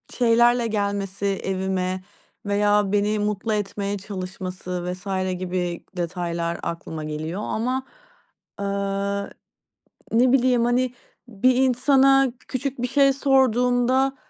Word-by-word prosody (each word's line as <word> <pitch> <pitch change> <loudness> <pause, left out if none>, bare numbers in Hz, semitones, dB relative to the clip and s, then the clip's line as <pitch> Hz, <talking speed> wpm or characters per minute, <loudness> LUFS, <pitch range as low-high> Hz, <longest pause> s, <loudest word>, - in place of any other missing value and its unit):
Şeylerle 235 0 +3
gelmesi 200 -2 -2
evime, 190 -1 -1 0.4
veya 205 0 +2
beni 210 +1 +1
mutlu 210 +1 -1
etmeye 205 0 -2
çalışması 185 -2 -5
vs. 185 +3 -13 0.3
gibi 180 -1 -3
detaylar 170 -1 -2
aklıma 160 -2 -5
geliyor. 155 +5 -4
Ama, 255 +4 -1 0.7
aaa, 200 0 -2 0.9
ne 245 +2 +4
bileyim, 250 -2 +3
hani 245 +1 +1 0.3
bir 240 +3 +2
insana 265 +1 +4
küçük 265 -1 -3
bir 245 - 0
şey 275 +1 +4
sorduğumda, 260 0 +2
205 Hz, 100 wpm, -23 LUFS, 185-250 Hz, 0.9 s, ne